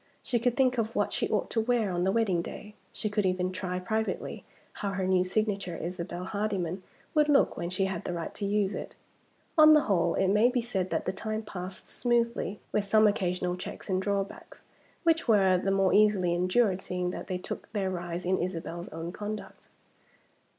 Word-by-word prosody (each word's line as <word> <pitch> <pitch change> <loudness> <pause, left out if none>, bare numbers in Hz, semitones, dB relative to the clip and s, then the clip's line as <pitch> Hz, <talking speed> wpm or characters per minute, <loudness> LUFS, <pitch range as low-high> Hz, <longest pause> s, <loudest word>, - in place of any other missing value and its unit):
She 240 - 0
could 245 +2 0
think 255 -2 +3
of 225 +1 -2
what - - +1
she - - -1
ought - - 0
to 225 - +1
wear 225 -3 +1
on 175 0 0
the 190 - +3
wedding 200 -6 +2
day; 210 +4 -8 0.2
she - - -3
could 210 0 0
even 185 -1 0
try 185 -1 -3
privately 220 +5 -2 0.4
how 200 -1 -1
her 190 0 -1
new 185 -1 +3
signature, 195 -2 -1
"Isabel 175 0 -5
Hardyman," 195 -3 -2 0.3
would 300 -1 +3
look 285 -1 +4
when 170 - -3
she 185 +1 0
had 190 -3 -3
the - - -3
right 170 -1 -4
to - - -7
use 205 -1 +1
it. - - -6 0.6
On 310 0 +9
the 300 - +6
whole, 175 -8 +1
it 190 - +2
may 210 +5 +5
be 250 0 0
said 195 -6 -2
that - - -1
the 185 - -1
time 215 +3 -3
passed 185 -2 -7
smoothly 235 -4 0
with 210 - +1
some 215 +2 +5
occasional 180 -3 +1
checks 185 +1 -7
and 185 0 +1
drawbacks, 200 0 -3 0.4
which 330 -2 +2
were 190 -5 +5
the 195 - -1
more 195 -1 +3
easily 205 -5 +4
endured 185 +3 +2
seeing 180 -1 -2
that - - -6
they 185 - -2
took 180 - -7
their 195 -3 -1
rise 175 -1 -4
in 185 +1 +1
Isabel's 175 -1 -4
own 165 +2 -5
conduct. 210 +2 -7
195 Hz, 200 wpm, -29 LUFS, 180-215 Hz, 0.6 s, On